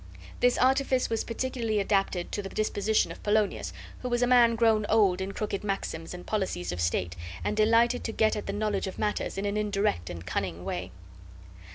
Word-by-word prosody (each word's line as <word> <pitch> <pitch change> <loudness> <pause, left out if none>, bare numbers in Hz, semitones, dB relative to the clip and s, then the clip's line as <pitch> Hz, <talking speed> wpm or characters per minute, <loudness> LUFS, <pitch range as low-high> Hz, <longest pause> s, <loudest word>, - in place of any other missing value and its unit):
This 245 0 +3
artifice 260 -1 +2
was 225 - 0
particularly 230 -2 -2
adapted 195 -3 0
to 205 - -2
the 195 - -6
disposition 215 0 +1
of - - -10
Polonius, 210 0 +1 0.3
who 250 - -4
was 240 0 +1
a - - +5
man 240 -2 +5
grown 225 -2 +3
old 200 -4 +4
in 190 +1 -3
crooked 200 -1 -3
maxims 195 -5 -3
and 180 0 -8
policies 190 - -2
of 90 0 -3
state, 85 0 0 0.3
and 210 - -1
delighted 230 +3 +3
to - - -1
get 220 0 +2
at 210 - -5
the - - -1
knowledge 205 -2 -1
of 190 - -6
matters 210 -2 -2
in 195 - -2
an 205 +1 -1
indirect 200 - 0
and 85 0 -7
cunning 90 -2 -3
way. 90 -1 -3
210 Hz, 195 wpm, -28 LUFS, 190-225 Hz, 0.3 s, a